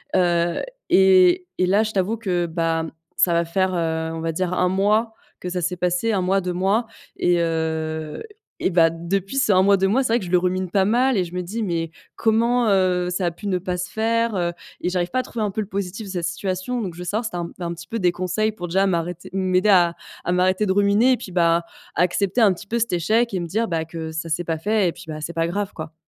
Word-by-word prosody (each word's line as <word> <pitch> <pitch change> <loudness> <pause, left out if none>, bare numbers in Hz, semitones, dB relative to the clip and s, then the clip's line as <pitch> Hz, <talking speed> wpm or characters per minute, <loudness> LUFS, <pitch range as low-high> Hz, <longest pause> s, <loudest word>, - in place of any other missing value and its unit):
heu, 175 -2 +2 0.3
et 185 -1 +5
et 185 - +4
là 205 +4 +3
je 220 - -3
t'avoue 200 +3 0
que, 180 -5 -1
ben, 165 -1 -1 0.3
ça 175 - +4
va 170 0 +2
faire, 185 +2 0
heu, 160 -1 -1
on 160 - -5
va 165 0 -1
dire 180 +2 -2
1 180 0 +2
mois 210 +4 +1 0.3
que 180 - -5
ça 180 0 -2
s'est 180 +1 -2
passé, 180 +6 0
1 195 - +1
mois 190 +2 +1
2 180 0 -3
mois 195 +6 +1 0.3
et, 175 0 +2
heu, 160 - -2 0.4
et, 185 - +1
bah, 165 -1 +5
depuis 190 +8 -3
ces 220 -7 +3
1 185 0 +5
mois 200 0 +5
2 195 +1 +2
mois, 260 +7 +2
c'est 225 - -1
vrai 240 - +3
que 185 - -6
je 175 - -7
le 180 - +5
rumine 185 0 -1
pas 195 0 +2
mal 245 +5 +2
et 185 - +2
je 170 - -11
me 180 - -2
dis: 215 +6 -4
«Mais 165 -3 -2 0.3
comment, 235 +2 +2
heu, 180 -2 +2
ça 180 0 -1
a - - 0
pu 200 +5 -8
ne 185 -2 +1
pas 180 0 -3
se 180 0 -4
faire?», 230 0 0
heu, 175 -1 0 0.3
et 180 - 0
j'arrive 180 -1 -1
pas 255 - +1
à - - 0
trouver 220 -2 -3
un 200 - -2
peu 215 - -2
le 200 - -5
positif 200 +1 -4
de - - -6
cette 175 -3 -2
situation, 185 +6 -3
donc 185 -5 -4
je 175 - -13
veux 180 - -6
savoir 215 +7 -1
si - - -3
tu 175 - -4
as - - -2
un 170 - -4
un 170 -1 -3
petit 170 0 -11
peu 230 - -3
des 180 -2 +3
conseils 185 +5 -1
pour 175 -4 -7
déjà 190 +3 +2
m'arrêter 175 -1 -2
m'aider 185 +1 +1
à 175 -3 +5 0.3
à 175 - 0
m'arrêter 185 +3 +2
de 190 - +1
ruminer, 205 +6 +4
et - - 0
puis, 185 - -9
bah, 170 -1 +3 0.3
à - - +1
accepter 195 +6 +1
un 200 -4 +6
petit 200 +3 -11
peu 235 +3 -1
cet 230 -2 0
échec 220 +6 +1
et 185 - 0
me 170 - -4
dire 225 +6 0 0.2
que 160 -1 -5
ça 160 +1 -4
s'est 170 +3 -1
pas 165 -1 -2
fait 205 +1 +1
et - - -2
puis, - - -12
bah, 155 -1 -6
c'est 170 +3 -5
pas 165 0 0
grave, 200 +3 -2
quoi. 155 0 -7
185 Hz, 270 wpm, -22 LUFS, 170-205 Hz, 0.4 s, un